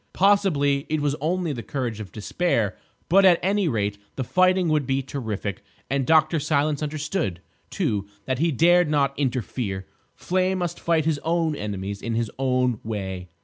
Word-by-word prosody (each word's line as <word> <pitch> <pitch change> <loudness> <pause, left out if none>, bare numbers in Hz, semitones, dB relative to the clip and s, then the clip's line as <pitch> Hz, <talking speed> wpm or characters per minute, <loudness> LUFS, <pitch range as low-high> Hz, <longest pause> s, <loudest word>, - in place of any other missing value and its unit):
Possibly 165 -9 +3
it 155 0 0
was 145 -1 0
only 170 0 0
the 120 - -5
courage 120 -4 -3
of 105 -3 -7
despair, 110 - 0 0.3
but 195 +4 +5
at 180 -3 +7
any 195 0 +2
rate 105 -6 -1 0.2
the 130 - -2
fighting 185 +5 +3
would 150 -4 +1
be 135 0 0
terrific. 110 -7 -4 0.3
And 135 -2 0
Dr. 160 0 +4
Silence 150 0 0
understood, 150 - -2 0.3
too, 100 -2 -1 0.2
that 130 -1 -1
he 165 +1 +2
dared 175 +3 +4
not 140 -2 +2
interfere. 120 -7 -2 0.3
Flame 185 +1 0
must 175 -2 -3
fight 165 -2 +1
his 160 -3 +1
own 165 0 0
enemies 100 -3 -4
in 115 -1 -2
his 115 -2 -1
own 125 -3 +1
way. 95 -4 -5
140 Hz, 165 wpm, -24 LUFS, 115-170 Hz, 0.3 s, at